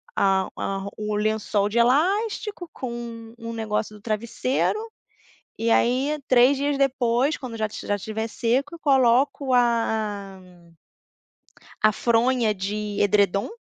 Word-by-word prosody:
a 190 -1 +2
a 195 - -2
ro 195 +1 -6
o 210 0 -3
lençol 210 -1 0
de 230 - -3
elástico 365 - +1
com 235 -2 -7
um 230 0 -6
negócio 215 -1 -3
do 210 - -15
travesseiro, 235 - -1 0.8
e 230 0 0
aí 265 +7 +2
3 255 +2 +5
dias 285 0 -1
depois 260 +1 +1
quando 245 -4 -7
já 215 - 0
estiv 215 - -8
já 205 - +2
estiver 220 +3 -4
seco 265 +9 -1
coloco 270 -1 +2
a 220 -5 0 1.4
a 215 0 +5
fronha 235 0 +2
de 205 +2 -4
edredom. 200 - +2
230 Hz, 130 wpm, -24 LUFS, 210-260 Hz, 1.4 s, 3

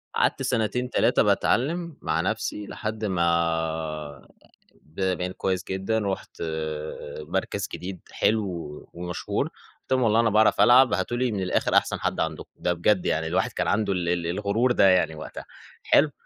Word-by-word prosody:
قَعَدت - - +1
سنتين، 125 0 0
3 - - +3
باتعلّم 165 +5 +1
مع - - 0
نفسي 105 -1 -3
لحد 110 0 -4
ما 80 -4 -1 0.5
ب 80 +5 -10 0.2
بقيت 90 0 -3
كويس 95 -1 -1
جدًا، 95 +4 0
رحت 100 -5 -4 0.8
مَركَز 75 - -2
جديد 95 0 -6
حلو 110 -1 +1 0.5
ومشهور، 90 0 -3
قلت - - -16
لهُم: 130 -1 +3
"والله 115 -1 +3
أنا 115 -1 +4
باعرف 110 +1 +4
ألعَب، 125 -1 +6
هاتوا 95 +7 -1
لي 125 -2 +1
من 100 - -2
الآخر 90 - 0
أحسن - - +1
حَد - - -2
عندكم، 80 -1 -3
ده 90 - 0
بجد 90 +2 +1
يعني." 80 +1 0
الواحد 95 +9 0
كان - - -2
عنده 100 -1 +1
ال 85 -2 -1
ال 85 -1 0
الغرور 105 +7 +1
ده 100 -5 +5
يعني 90 -4 +3
وقتها، 75 - -8 0.4
حلو؟ 150 +1 +4
95 Hz, 160 wpm, -25 LUFS, 85-115 Hz, 0.8 s, ألعَب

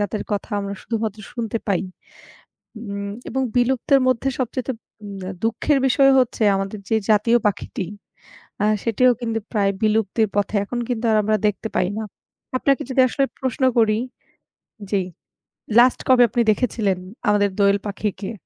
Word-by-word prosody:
যাদের 205 0 -2
কথা 205 +2 -3
আমরা 200 0 -4
শুধুমাত্র 220 -2 -3
শুনতে 230 -1 -3
পাই। 195 -3 +2 1.0
উম 200 -2 -5 0.2
এবং 265 - -1
বিলুপ্তের 255 +2 +3
মধ্যে 255 +1 +1
সবচাইতে 255 +1 -2 0.3
উম 200 -1 -7
আ - - -3
দুঃখের 230 +6 +1
বিষয় 275 +1 +5
হচ্ছে 250 -3 0
আমাদের 195 +2 -3
যে 225 - +2 0.2
জাতীয় 220 +3 +4
পাখিটি 200 -1 -3 0.8
আ - - +3 0.2
সেটিও 245 +2 +3
কিন্তু 225 -2 -1
প্রায় 200 -3 +2
বিলুপ্তির 215 0 +2
পথে। 205 +1 0
এখন 240 +4 -5
কিন্তু 240 -2 -1 0.2
আমরা 215 +1 +2
দেখতে 210 +2 -4
পাই 180 - +2
না। 220 - -3 0.5
আপনাকে 275 +1 +1
যদি 260 - +2
আসলে 275 +2 +1 0.2
প্রশ্ন 260 +1 -3 0.2
করি 215 -1 +3 0.9
জি 200 -2 +1 0.8
লাস্ট 250 +1 +5
কবে 255 -1 +7
আপনি 240 - +1
দেখেছিলেন 210 -4 0 0.3
আমাদের 205 -1 +3
দোয়েল 200 0 +4
পাখিকে? 200 0 -4
220 Hz, 145 wpm, -21 LUFS, 205-245 Hz, 1.0 s, কবে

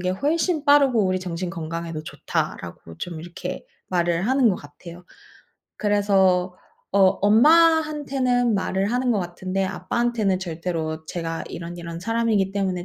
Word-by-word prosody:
게 180 - -2
훨씬 310 - 0
빠르고 280 -7 +5
우리 185 0 0
정신 180 0 -4
건강에도 165 -2 -5
좋다."라고 85 - -5
좀 170 -3 -6
이렇게 170 +1 -7 0.2
말을 175 -1 0
하는 260 -2 +4
것 190 - +1
같아요. 170 +5 -12 0.7
그래서 190 -3 +2 0.4
어 200 - +2 0.2
엄마한테는 275 -1 +4
말을 195 0 -1
하는 250 0 +1
것 205 - 0
같은데 185 +2 -3
아빠한테는 215 +1 -1
절대로 160 -2 -4
"제가 165 -1 -4
이런이런 170 0 -7
사람이기 225 -1 +1
때문에 190 -3 -1
190 Hz, 320 characters per minute, -23 LUFS, 175-240 Hz, 0.7 s, 빠르고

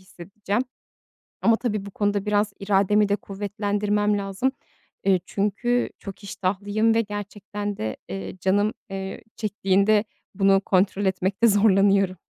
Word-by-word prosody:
hissedeceğim. 195 +4 -4 0.8
Ama 230 - +5
tabii 215 -4 -2
bu 200 - -8
konuda 205 0 0
biraz 210 0 +1
irademi 200 +1 +3
de 200 - +3
kuvvetlendirmem 205 +1 -1
lazım. 200 +6 -1 0.5
Eee, 190 -1 +3
çünkü 225 +6 0
çok 195 0 -9
iştahlıyım 205 +3 0
ve 230 - +4
gerçekten 205 -1 -5
de, 110 0 -3
ııı, 95 - -6
canım, 205 +3 +1 0.2
eee, 195 0 -6
çektiğinde 205 0 +2 0.3
bunu 195 0 +4
kontrol 195 +1 +1
etmekte 190 +4 +2
zorlanıyorum. 195 -2 +4
205 Hz, 120 wpm, -24 LUFS, 195-210 Hz, 0.8 s, Ama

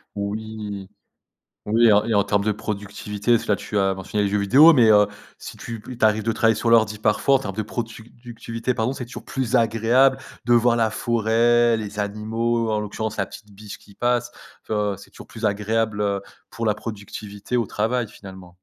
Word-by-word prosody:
Oui, 105 -1 -5 0.8
oui, 115 +3 +3
et 105 - +6
en 105 +1 +4
et 115 - -1
en 100 -1 +4
termes 100 0 +1
de 105 - +1
productivité, 105 +1 -4
parce 115 - +1
que - - 0
là, - - +4
tu 105 - -3
as 95 0 +2
mentionné 100 +2 -2
les 100 - 0
jeux 105 - 0
vidéo, 140 +11 +7
mais 120 -5 +5
heu, 105 -1 +5 0.3
si - - -9
tu 115 -1 -7
p 115 - -11
il - - -12
t'arrive 110 -2 +2
de 115 - 0
travailler 115 -1 +3
sur 115 - -1
l'ordi 110 -2 +3
parfois, 110 +6 +2
en - - +3
termes 100 -5 -6
de 110 - -1
productivité 115 +2 -5
pardon, 110 +3 -1
c'est 130 -3 -6
toujours 125 - -10
plus 130 -2 -2
agréable 120 +4 +3 0.3
de 120 - +2
voir 120 0 +4
la 115 -2 +2
forêt, 115 +1 +2
les 105 -1 -6
animaux, 110 +3 -1
en 105 -1 0
l'occurrence 110 +1 -4
la 100 - -1
petite 105 +1 -13
biche 105 +1 -10
qui 100 - -20
passe, 120 0 0 0.4
tu - - -4
vois, 105 -2 -1
c'est 100 - -15
toujours - - -13
plus 115 -1 -5
agréable, 105 +1 0
heu, 100 -1 0 0.3
pour 115 -3 -5
la 105 - +3
productivité 105 +1 -7
au 120 -3 +1
travail, 115 +3 -1
finalement. 95 -3 -12
110 Hz, 210 wpm, -22 LUFS, 105-115 Hz, 0.8 s, vidéo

